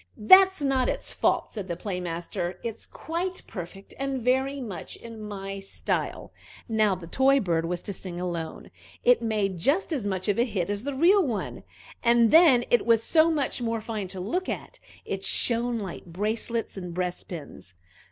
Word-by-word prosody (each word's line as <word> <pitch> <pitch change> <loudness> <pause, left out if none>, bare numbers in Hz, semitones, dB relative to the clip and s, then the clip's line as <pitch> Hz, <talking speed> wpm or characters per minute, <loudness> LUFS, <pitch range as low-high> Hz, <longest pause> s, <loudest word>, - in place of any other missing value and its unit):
"That's 375 - +7
not 270 -2 +2
its - - -3
fault," - - +1
said 205 -4 -5
the 170 - -3
Play 180 +1 -4
master: 175 +1 -4
"it's 230 -2 -6
quite 355 +3 -4
perfect, 195 0 -9
and 275 -1 -1
very 265 +3 +1
much 205 -9 -6
in 230 -2 -10
my 195 -2 -6
style." 195 - -3 0.4
Now 215 -3 +2
the 175 -2 -9
toy 270 +9 +3
bird 165 -6 0
was 175 +1 -3
to 200 - -4
sing 180 -2 -5
alone. 170 -3 -5 0.3
It - - +5
made 205 -5 -1
just 320 - +1
as 245 -9 -2
much 190 -1 -2
of 205 +1 +1
a - - +5
hit 200 -6 -2
as 205 +4 -3
the 285 -1 -3
real 370 +8 +5
one, 240 -9 -3 0.4
and 235 -1 +4
then 305 -8 +7
it 240 - +4
was 230 -1 +4
so 320 0 +4
much 290 -5 -1
more 230 -1 -1
fine 215 -3 -4
to 185 +1 -7
look 350 - -2
at - - -6 0.3
it 195 0 -4
shone 235 +2 +1
like 195 -5 -6
bracelets 215 +5 -2
and 180 -3 -6
breastpins. 175 - -5
215 Hz, 180 wpm, -26 LUFS, 185-265 Hz, 0.4 s, That's